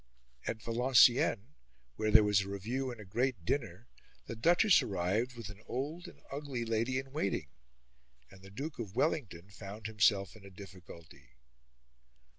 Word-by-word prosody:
At 110 0 -3
Valenciennes, 120 -1 +4 0.5
where 110 0 -1
there 110 0 +7
was 105 -2 +3
a 95 - -6
review 120 +7 -3
and 120 -2 -8
a 105 - -9
great 115 -1 -1
dinner, 115 -4 -2 0.4
the 115 - -6
Duchess 175 - +5
arrived 100 +7 -1
with 115 -3 -7
an 105 +1 -11
old 150 +7 -4
and - - -14
ugly 140 -4 -4
lady 115 +3 0
in 135 0 -5
waiting, 100 - -2 0.8
and 95 - -15
the 95 - -13
Duke 140 +9 -6
of 105 -3 -6
Wellington 100 - -1
found 100 +3 -9
himself 105 -3 +2
in 110 - -15
a 100 - -11
difficulty. 85 - -13
110 Hz, 155 wpm, -33 LUFS, 100-130 Hz, 0.8 s, there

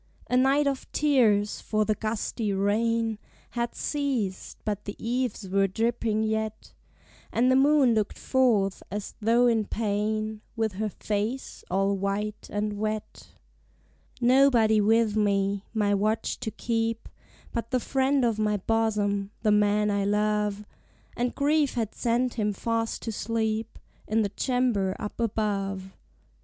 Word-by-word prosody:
A - - +3
night 270 +3 +4
of 275 -2 -2
tears! 225 -9 +2
for 215 -1 0
the 215 - +2
gusty 215 0 -2
rain 220 +3 +1 0.3
Had 235 0 -2
ceased, 260 -10 -2
but 210 -1 -3
the 205 - -5
eaves 240 -3 -2
were 195 +1 +2
dripping 225 +1 0
yet; 220 0 -3 0.6
And 250 +3 +3
the - - +4
moon 275 -2 +5
looked 215 -2 -1
forth, 225 -7 +2
as 205 +1 -5
though 230 +3 +4
in 225 -3 +2
pain, 215 0 -2
With 225 -2 0
her 215 - 0
face 215 +6 -3
all 195 +2 +1
white 200 +2 -3
and 205 0 -2
wet: 215 0 -4 0.9
Nobody 240 -4 +5
with 220 0 +3
me, 200 -1 +1
my 210 -2 +1
watch 215 +3 0
to - - -3
keep, 225 0 -2 0.4
But 230 -1 -3
the 255 - +1
friend 270 +1 +1
of 225 -2 0
my 210 -1 +1
bosom, 205 -2 0
the 215 - +3
man 210 0 +3
I 200 -1 +1
love: 210 0 0 0.5
And 245 0 -1
grief 290 -1 +2
had 225 -3 -2
sent 245 +1 0
him 210 -1 +1
fast 225 +2 -2
to 225 - -3
sleep 220 0 -2 0.3
In 220 +1 +2
the 200 - -1
chamber 235 -6 0
up 210 - -6
above. 195 -4 -2
220 Hz, 140 wpm, -27 LUFS, 205-235 Hz, 0.9 s, moon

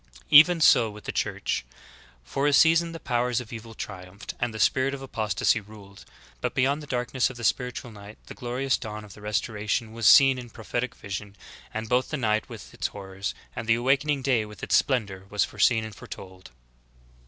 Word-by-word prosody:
15. - - -19
Even 160 +3 +8
so 115 -6 +6
with 105 0 -11
the - - -4
Church. - - -2 0.6
For 135 - -1
a 145 - +3
season 165 +3 +5
the 165 - -7
powers 125 -2 0
of 120 -2 -9
evil 115 0 -9
triumphed, 95 0 -8
and 120 -1 -1
the 110 - -7
spirit 135 +5 +2
of 135 - -10
apostasy 110 -3 0
ruled. 100 -2 -14 0.4
But - - -2
beyond 140 +4 +2
the 150 - -10
darkness 125 0 0
of 130 - -10
the 120 - -8
spiritual 125 0 -1
night 105 0 -12
the - - -9
glorious 125 +2 -1
dawn 110 -3 -7
of 100 - -13
the 105 - -14
restoration 105 +2 -2
was 115 -2 +1
seen 135 +1 +7
in 120 -1 -9
prophetic 120 +3 -4
vision, 100 0 -7 0.4
and 110 0 -4
both 125 +3 +1
the 150 - -2
night 110 -4 0
with - - -10
its - - -2
horrors, 95 -1 -6 0.2
and 110 - -5
the 115 - +5
awakening 135 +3 +1
day 125 -5 +2
with 105 0 -12
its - - +2
splendor, 100 -8 0
were 105 - -10
foreseen 110 +2 +2
and 110 -1 -7
foretold. 95 -2 -11
115 Hz, 200 wpm, -26 LUFS, 105-130 Hz, 0.6 s, Even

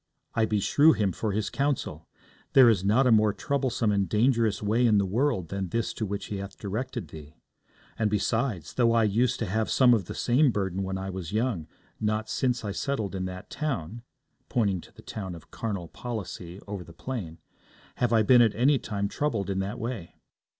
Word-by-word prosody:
I 115 - +2
beshrew 110 +9 +4
him 105 -4 +1
for 105 +5 -2
his 105 +1 -2
counsel. 135 - -2 0.5
There 130 -3 +8
is 95 -4 0
not 110 +7 +3
a 125 - +4
more 110 -2 +4
troublesome 130 -3 0
and 100 -3 +1
dangerous 115 +1 +2
way 115 +4 +3
in 110 -2 +4
the 100 - +3
world 100 - 0
than 95 -1 -3
this 115 +2 -1
is - - -5
to 110 - -3
which 100 +1 -4
he 100 - -4
hath 100 0 -7
directed 110 - -4
thee. 75 0 -11 0.6
And 110 -2 +2
besides, 105 - -1
though 115 -2 +3
I 115 -1 +4
used 120 +4 +2
to - - +1
have 110 +3 -1
some 125 -2 +5
of 105 -6 +1
the - - -7
same 130 +4 +3
burden 95 -4 -1
when 95 0 -2
I 95 0 -4
was 90 -3 -6
young, 110 -8 -1 0.3
not 110 0 -1
since 125 -3 0
I 100 - -2
settled 110 -4 -2
in 95 -1 -2
that 90 0 -7
town,' 120 - -3 0.5
pointing 100 -7 +1
to - - -16
the - - -16
town 95 -5 -6
of 85 - -14
Carnal 100 -6 -4
Policy 95 -5 -6
over 100 -3 -5
the 85 - -14
plain, 90 -5 -5 0.6
'have 120 -2 +1
I 110 -2 +4
been 125 +2 +6
at 115 -3 +3
any 135 +5 +3
time 100 -2 -2
troubled 105 -6 -1
in 95 - -1
that 95 +2 -3
way.' 115 -7 -5
105 Hz, 205 wpm, -27 LUFS, 95-120 Hz, 0.6 s, There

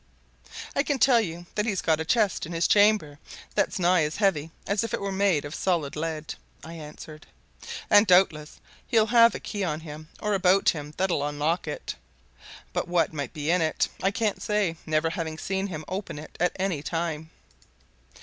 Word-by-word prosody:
"I - - +3
can 290 -1 -1
tell 240 -1 +5
you 175 -3 -5
that 210 +1 -1
he's 195 -5 0
got 160 -1 +2
a 160 - -2
chest 210 -5 +1
in 170 - -7
his 165 0 +2
chamber 205 -9 +3 0.3
that's - - 0
nigh 180 -1 +3
as 150 +1 -2
heavy 175 -7 +1 0.2
as 200 +2 0
if 230 - -2
it - - -6
were 200 0 -3
made 190 -6 +1
of 145 - -7
solid 170 -7 -1
lead," 155 0 -4 0.3
I 165 - -9
answered. 155 -1 -10 0.6
"And 205 +1 +6
doubtless 170 -5 +3 0.3
he'll 220 -2 +4
have 230 0 +5
a - - -4
key 205 -2 -4
on 155 -3 -2
him 155 0 -9
or 210 -1 -1
about 190 0 +4
him 150 -1 -4
that'll 180 -6 +1
unlock 150 +4 -1
it. - - -4 0.8
But - - -1
what 175 -2 +1
might 145 -4 -4
be 150 +1 -1
in 180 0 +3
it, 160 -1 +1
I 195 - +3
can't 210 0 -1
say, 210 -5 0
never 155 +1 +1
having 160 -2 -4
seen 195 +4 -2
him 155 -5 -6
open 185 -4 -5
it 155 +1 -10
at 175 0 +2
any 185 -6 -1
time." 160 -1 -3
170 Hz, 190 wpm, -26 LUFS, 155-200 Hz, 0.8 s, And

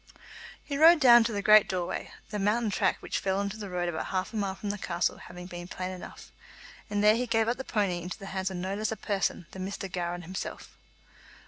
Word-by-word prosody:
He 280 -1 -4
rode 330 +1 +8
down 240 -4 +8
to 230 - -1
the 200 -2 -3
great 215 -1 +7
doorway, 180 -2 -3 0.2
the 210 - -2
mountain 210 +2 +1
track - - +1
which - - -2
fell 190 0 0
on 200 0 -1
to 205 - -7
the 205 -2 -6
road 175 -1 -2
about 165 -2 -3
half 185 +4 -2
a - - -6
mile 200 -3 -1
from 205 +1 -4
the 205 - -6
castle 175 - -1
having 180 0 -10
been 175 -1 -8
plain 185 0 -5
enough, 185 -1 -10 0.6
and 205 0 0
there 210 +1 +6
he 245 +2 -1
gave 225 -1 +2
up 240 - 0
the 265 - -5
pony 195 -8 -1
into 180 +1 -6
the 195 - -10
hands 190 0 -1
of 190 - -5
no 185 +2 -3
less 215 +2 -2
a 220 - -3
man 195 -3 0
than 190 - -6
Mr. 200 0 -5
Gowran 175 -1 -3
himself. 185 +3 -7
195 Hz, 240 wpm, -29 LUFS, 180-215 Hz, 0.6 s, rode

